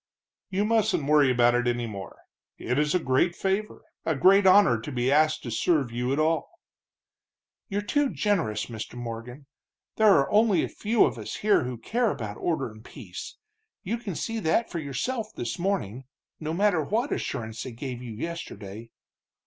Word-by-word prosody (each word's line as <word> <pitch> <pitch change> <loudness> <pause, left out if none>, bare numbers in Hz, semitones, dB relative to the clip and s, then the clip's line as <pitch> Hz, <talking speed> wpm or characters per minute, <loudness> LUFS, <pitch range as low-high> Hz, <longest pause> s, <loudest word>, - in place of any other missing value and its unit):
"You 195 +2 0
mustn't 215 -9 +2
worry 145 -2 +5
about 120 -1 +4
it 120 0 +1
any 120 0 0
more. 100 -4 -8 0.4
It 125 +4 -1
is 150 +3 +1
a - - +4
great 160 +5 +1
favor, 195 +2 -2 0.2
a 160 - 0
great 190 +8 +5
honor, 185 - +6
to 145 - -6
be 125 0 0
asked 155 +1 +3
to 120 - -5
serve 140 +1 +1
you 125 +2 -2
at 140 - 0
all." 160 +1 +1 1.2
"You're 205 0 -2
too 290 +5 +1
generous, 165 - 0
Mr. 110 0 -7
Morgan. 120 +3 -7 0.5
There 220 -1 +6
are 135 - +2
only 210 -2 +4
a - - -3
few 220 +1 +2
of - - -3
us - - -6
here 205 -11 +4
who 125 -1 -4
care 230 - 0
about 105 - -5
order 155 -9 -1
and 110 0 -14
peace - - -9 0.5
you 225 +5 -2
can 205 -7 -5
see 225 +6 -3
that 220 +5 +1
for 170 - -3
yourself 210 - -3
this 120 +7 -4
morning 135 - -2 0.3
no 155 0 -3
matter 180 -1 +2
what 230 - -1
assurance 110 0 -4
they 130 - -6
gave 120 +1 -6
you 120 -3 -7
yesterday. 115 -7 -7
150 Hz, 180 wpm, -26 LUFS, 120-200 Hz, 1.2 s, honor